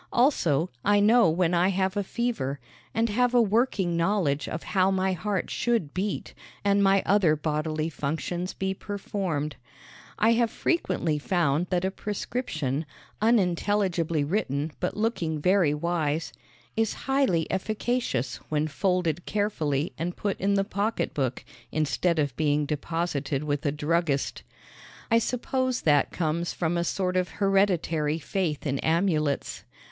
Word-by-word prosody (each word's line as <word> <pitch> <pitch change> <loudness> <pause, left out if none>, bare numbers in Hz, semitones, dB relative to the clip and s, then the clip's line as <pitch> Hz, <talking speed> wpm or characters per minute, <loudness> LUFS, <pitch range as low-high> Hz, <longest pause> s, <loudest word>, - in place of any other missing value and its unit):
Also, 180 - +2
I 205 0 +4
know 220 -1 +5
when 170 +1 +1
I 175 +1 +4
have 190 0 0
a 205 - 0
fever, 195 - -2 0.3
and 225 +1 +1
have 245 +3 +2
a - - +7
working 210 -5 +2
knowledge 170 -5 +1
of 155 - -4
how 190 -1 +2
my 190 0 +1
heart 195 +1 -2
should 230 -12 0
beat 195 +2 -3 0.3
and 200 0 +4
my 195 0 +4
other 190 -6 +4
bodily 155 +1 -1
functions 165 +4 -3
be 190 0 -1
performed. 190 -7 -3 0.6
I 225 +2 +4
have 230 0 +3
frequently 175 - 0
found 170 0 +1
that 180 0 0
a 190 - 0
prescription, 165 - -3 0.3
unintelligibly 185 -6 +2
written 150 -3 -1
but 180 - -2
looking 175 -8 -1
very 180 -1 +3
wise, 160 -1 -1 0.4
is 225 -1 0
highly 270 - +2
efficacious 215 - -1
when 155 0 +1
folded 175 0 0
carefully 160 -8 -1
and 175 +2 -3
put 200 -1 -2
in 200 +1 +2
the 195 - +3
pocketbook 200 - -2 0.3
instead 160 +3 +1
of 145 -5 0
being 150 -1 +1
deposited 150 -2 -2
with 145 0 -1
a - - +2
druggist. 150 -1 0 0.7
I 230 - +6
suppose 255 +2 -1
that 145 -2 +3
comes 170 +1 -1
from 170 0 -1
a 170 - +1
sort 185 +1 -1
of 180 -1 +1
hereditary 180 -6 +2
faith 165 -2 -2
in 140 -2 -1
amulets. 160 -4 0
175 Hz, 140 wpm, -27 LUFS, 155-205 Hz, 0.7 s, a